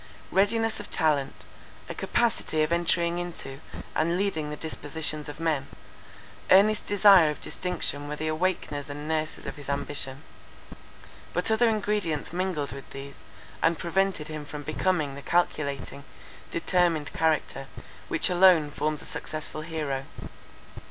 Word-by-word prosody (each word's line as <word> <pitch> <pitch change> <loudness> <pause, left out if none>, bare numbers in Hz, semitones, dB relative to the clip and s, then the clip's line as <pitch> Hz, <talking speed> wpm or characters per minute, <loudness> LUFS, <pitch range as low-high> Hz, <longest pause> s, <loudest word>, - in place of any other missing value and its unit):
Readiness 225 +3 +2
of - - -8
talent, 150 -5 0 0.4
a - - -5
capacity 225 -9 +1
of 155 - -1
entering 170 0 +1
into, 160 -6 -6 0.3
and 170 +2 +1
leading 170 -6 -1
the 150 - -4
dispositions 155 -1 -4
of 145 - -8
men; 160 -4 0 0.8
earnest 210 +3 +5
desire 195 -5 +7
of 150 - -4
distinction 145 -5 -2
were 150 - -3
the 155 +1 -3
awakeners 155 -3 -1
and 145 +1 -6
nurses 155 -1 -2
of - - -6
his 145 -1 -9
ambition. 140 -1 -2 1.1
But 180 +5 +1
other 230 +1 +4
ingredients 205 -9 -1
mingled 180 -5 -1
with 140 0 -9
these, 140 0 -9 0.4
and 165 0 +3
prevented 180 -2 0
him 155 -1 -5
from 145 0 -7
becoming 155 -1 0
the 140 - -8
calculating, 140 -4 -1 0.5
determined 170 -3 +1
character, 155 -4 0 0.4
which - - +2
alone 175 -5 +6
forms 150 +1 -2
a - - -10
successful 155 0 -3
hero. 150 -4 -3
155 Hz, 135 wpm, -27 LUFS, 145-180 Hz, 1.1 s, desire